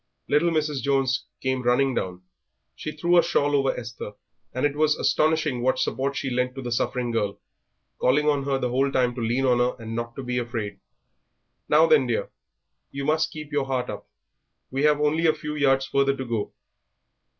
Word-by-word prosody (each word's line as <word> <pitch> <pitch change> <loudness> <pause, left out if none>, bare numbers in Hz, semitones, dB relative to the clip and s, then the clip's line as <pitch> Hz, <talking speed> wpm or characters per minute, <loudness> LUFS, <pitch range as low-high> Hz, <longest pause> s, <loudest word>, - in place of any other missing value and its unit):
Little 150 +4 +3
Mrs. 150 -4 0
Jones 135 -2 +1 0.2
came 130 0 0
running 125 +2 +2
down; 90 -4 -3 0.5
she 155 - -5
threw 170 +4 +3
a - - +4
shawl 145 -3 +1
over 135 -1 +2
Esther, 115 -3 -7 0.4
and 130 +3 -1
it 145 -1 0
was 150 0 +3
astonishing 155 -5 +1
what 130 +1 +2
support 140 +1 -1
she 135 - -2
lent 125 +1 -1
to 135 - -6
the 120 - -4
suffering 120 +1 -1
girl, 105 -3 -1 0.6
calling 150 +4 +3
on 145 -2 +2
her 140 -1 +1
the 125 -2 -1
whole 135 +2 +1
time 125 -2 +2
to 120 - -5
lean 120 +4 0
on 125 -2 +3
her 125 +1 +1
and 115 0 -6
not 115 0 -4
to 135 - -6
be 125 0 -1
afraid. 115 -5 -4 0.9
"Now 155 +2 +6
then, 135 -5 +4
dear, 120 - -2 0.6
you 140 0 -5
must 155 +2 +1
keep 150 -1 -8
your 145 -2 0
heart 130 -2 -1
up, - - -8 0.6
we 135 +1 -1
have 150 -1 +4
only 155 +3 +2
a 155 - +3
few 150 0 -5
yards 135 -2 +2
further 140 0 +1
to 130 - -4
go." 115 -3 -3
135 Hz, 195 wpm, -25 LUFS, 125-150 Hz, 0.9 s, Now